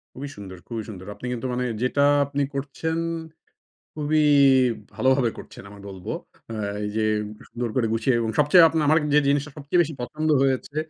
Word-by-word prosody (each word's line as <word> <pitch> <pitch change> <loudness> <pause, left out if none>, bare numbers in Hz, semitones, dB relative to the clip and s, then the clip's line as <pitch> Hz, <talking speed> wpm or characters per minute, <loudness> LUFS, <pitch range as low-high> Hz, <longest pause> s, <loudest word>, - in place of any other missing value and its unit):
খুবই 140 +2 -6
সুন্দর, 95 -2 -9
খুবই 115 -2 -4
সুন্দর। 95 -3 -9
আপনি 105 - -10
কিন্তু 125 +1 -5
মানে 125 +1 -1 0.2
যেটা 125 +3 +1 0.2
আপনি 140 0 -3
করছেন 145 +4 -3 1.0
খুবই 155 0 +1 0.7
ভালোভাবে 130 -2 +2
করছেন - - -11
আমি 100 0 -13
বলবো। 95 -2 -7 0.4
আ - - -5 0.3
এই 105 - -2
যে 110 - +1 0.4
সুন্দর 120 0 -4
করে 125 -3 +2
গুছিয়ে 115 +3 +1
এবং 115 -1 -1
সবচেয়ে 165 +4 +7
আপনার 160 -1 0
আমার 155 +2 +5 0.2
যে - - +7
জিনিসটা 145 +1 +1
সবচেয়ে 150 +4 +1
বেশি 160 -1 -5
পছন্দ 150 +6 -3
হয়েছে 135 +2 -1
135 Hz, 170 wpm, -24 LUFS, 115-150 Hz, 1.0 s, সবচেয়ে